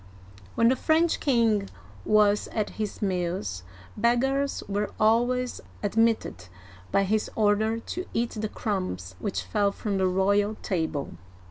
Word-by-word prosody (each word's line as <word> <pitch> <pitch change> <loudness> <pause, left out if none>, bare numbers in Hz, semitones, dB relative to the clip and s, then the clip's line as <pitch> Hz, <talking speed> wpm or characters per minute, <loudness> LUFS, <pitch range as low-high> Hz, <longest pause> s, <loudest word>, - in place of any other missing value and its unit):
'* 95 -1 -21
When 230 - +4
the 260 - +3
French 320 +4 +2
king 225 -7 +2 0.4
was 210 -1 +3
at 215 -2 -1
his 210 +1 -3
meals, 175 - -2 0.3
beggars 265 +5 +1
were 205 +1 -1
always 245 +3 +2 0.2
admitted 215 - +1 0.4
by 195 - +3
his 215 +2 0
order 215 +1 +2
to 360 +9 -6
eat 235 +1 -1
the 215 -1 -3
crumbs 185 - -3
which 200 - -2
fell 205 -2 +1
from 200 -1 -3
the 190 - +3
royal 200 +3 +2
table. 160 -6 -2
210 Hz, 135 wpm, -26 LUFS, 190-230 Hz, 0.4 s, When